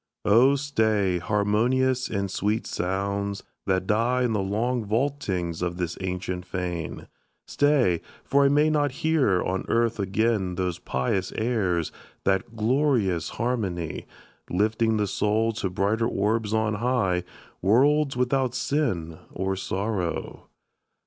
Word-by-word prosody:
Oh, 120 +7 +5
stay, 110 -10 +1
harmonious 120 +7 +1
and 100 -2 -2
sweet 105 +4 -1
sounds, 100 +2 -2 0.2
that 95 -1 +1
die 120 +5 +2
In 120 -2 +1
the 105 - +1
long 115 +5 -1
vaultings 105 - -1
of 90 -1 -2
this 90 -1 -2
ancient 90 -1 -3
fane! 90 -4 -4 0.4
Stay, 140 - +2 0.2
for 140 +1 +3
I - - +5
may 150 +2 +3
not 145 -2 +2
hear 140 - +3
on 95 +1 -2
earth 115 -1 +1
again 100 -1 0
Those 90 -1 -2
pious 90 +9 -1
airs 100 -8 0 0.3
that 95 +3 0
glorious 115 - +1
harmony; 100 -10 -2 0.4
Lifting 110 +4 +1
the 105 - +1
soul 105 +3 +1
to 100 -3 -2
brighter 100 +5 0
orbs 105 0 0
on 110 -1 +1
high, 110 -8 +1 0.4
Worlds 135 +7 +3
without 125 0 +1
sin 95 - -1
or 95 +1 -2
sorrow! 95 -2 -3
105 Hz, 125 wpm, -25 LUFS, 95-125 Hz, 0.4 s, Oh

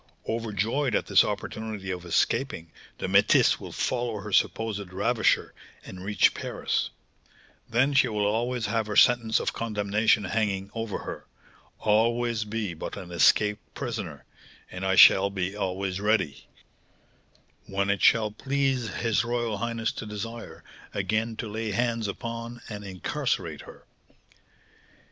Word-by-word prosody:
Overjoyed 115 +3 -1
at - - 0
this - - +5
opportunity 110 -3 -4
of 90 -1 -5
escaping, 85 - 0 0.3
the - - -4
métisse - - +4
will - - -8
follow 120 -4 -2
her 105 - -7
supposed 105 -3 0
ravisher, 110 +5 +1 0.3
and 95 -1 -9
reach 105 +1 +3
Paris; - - -2 0.8
then 130 +5 +2
she 135 - +5
will 105 -2 -1
always 120 +3 0
have 110 +1 -1
her 105 - -3
sentence 120 -2 +5
of - - -2
condemnation 105 -1 +1
hanging 100 -1 -1
over 115 -3 -3
her, - - -8 0.5
always 115 +1 +1
be 105 -3 -3
but 80 - -6
an 90 -3 -8
escaped 105 - +2
prisoner, - - -5 0.5
and 90 +1 -6
I 95 0 +2
shall 95 +1 +8
be 95 0 -3
always 95 -1 -2
ready, 105 -9 0 1.2
when 100 +1 0
it 100 - -1
shall 110 -2 +4
please 135 -1 -1
his 115 -2 0
royal 120 -3 -2
highness 115 -1 -1
to 110 - -7
desire, 115 +2 -7 0.3
again 110 +4 -1
to 115 - -5
lay 110 +1 -3
hands 115 0 0
upon 115 +3 -5
and 105 -1 -6
incarcerate 95 -3 -3
her." - - -15
110 Hz, 135 wpm, -27 LUFS, 100-115 Hz, 1.2 s, shall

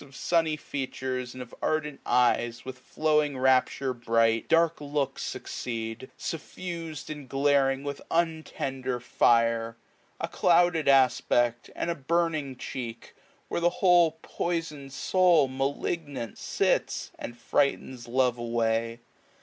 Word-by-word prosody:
Of 140 -1 -16
sunny 160 +1 +1
features, 130 -3 -4
and 130 - -5
of 120 - -17
ardent 150 -2 -1
eyes 120 -1 +2
With 130 -1 -7
flowing 150 0 +1
rapture 130 0 +2
bright, 115 -1 +1
dark 165 -1 +3
looks 145 -1 -2
succeed^ 115 0 -5
iq8^ - - -29
Suffus'd 165 -2 -6
and 145 -4 -8
glaring 135 -1 +2
with 140 -1 -5
untend^ 135 -6 -2
fire; 115 -1 +2 0.4
A - - -2
clouded 175 -2 +3
aspect, 125 -3 +3
and 170 - -1
a - - +1
burning 155 -2 -1
cheek. 120 -3 -7 0.3
Where - - -2
the 175 - +4
whole 175 -3 +4
poisoix*d 165 -5 -3
soul, 170 +1 +3
malignant, 135 - -3
sits. - - 0
And 120 - -7
frightens 130 -3 0
love 125 0 +1
away. 115 0 -1
135 Hz, 120 wpm, -27 LUFS, 120-155 Hz, 0.4 s, the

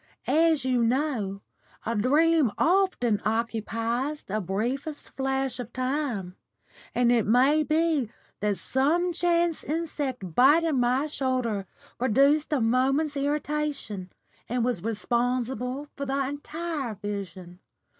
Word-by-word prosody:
As 320 -4 +3
you 250 -2 +2
know, 230 -6 -1 0.4
a 230 - -1
dream 295 +4 +3
often 330 - +2
occupies 230 +5 -1
the 215 +2 -3
briefest 245 - -3
flash 270 -1 -1
of 240 -1 -6
time, 255 -8 -2 0.6
and 245 0 +3
it 235 -4 +2
may 265 +7 +4
be 310 -5 +1 0.3
that 205 -1 0
some 335 +7 +1
chance 340 -1 +1
insect 285 - -3
biting 295 - +4
my 250 +4 +2
shoulder 255 -9 -1 0.3
produced 275 +6 +3
a 295 - +2
moment's 270 +6 +2
irritation, 285 -8 -2 0.4
and 240 0 0
was 245 -8 -1
responsible 245 +4 -1
for 280 -1 -4
the 270 0 0
entire 290 -3 -4
vision. 190 -3 -6
260 Hz, 115 wpm, -27 LUFS, 230-300 Hz, 0.6 s, may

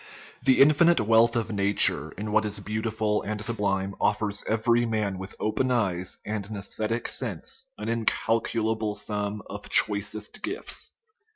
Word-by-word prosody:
The 130 0 +4
infinite 160 +4 +6
wealth 115 +2 +4
of 115 -2 -1
nature 100 0 +3
in 105 +2 -5
what 110 +1 +3
is 105 -1 -2
beautiful 110 0 -1
and 105 0 -4
sublime 100 -4 -1
offers 105 -1 0
every 115 +2 +2
man 110 -5 -1
with 95 +1 -7
open 110 +5 0
eyes 95 -7 -1
and 105 -1 -3
an 110 - -5
aesthetic 110 +3 -2
sense 460 +2 -2
an - - -6
incalculable 110 -1 0
sum 105 0 -3
of - - -8
choicest 105 +1 +1
gifts. 395 +5 -1
110 Hz, 145 wpm, -26 LUFS, 105-115 Hz, -, infinite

